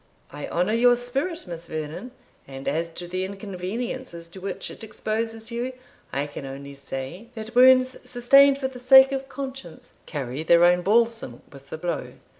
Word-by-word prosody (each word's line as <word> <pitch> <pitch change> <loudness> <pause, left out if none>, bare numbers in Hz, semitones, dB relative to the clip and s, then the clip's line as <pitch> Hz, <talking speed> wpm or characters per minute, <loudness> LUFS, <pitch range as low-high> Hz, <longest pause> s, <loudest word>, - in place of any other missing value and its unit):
"I 145 0 -6
honour 180 +5 0
your 245 +1 +5
spirit, 270 +8 -2
Miss 170 -2 -8
Vernon; 155 +9 -5 0.4
and 135 0 -9
as 165 +4 0
to 175 +1 -8
the 185 +1 -3
inconveniences 195 0 -5
to 185 +2 -12
which 195 - -4
it - - -11
exposes 225 +1 -4
you, 240 +2 -3 0.4
I 140 +1 -1
can 145 0 -8
only 140 +1 -8
say, 140 - -7
that 220 +1 -7
wounds 255 +1 +6
sustained 275 +3 +6
for 270 -1 -2
the 260 -1 -10
sake 265 +2 +8
of 270 0 -4
conscience 265 - -8
carry 135 -1 -4
their 170 +1 +5
own 175 0 +5
balsam 225 - +1
with 140 0 -15
the - - -5
blow." 175 +1 -4
205 Hz, 170 wpm, -25 LUFS, 165-250 Hz, 0.4 s, sake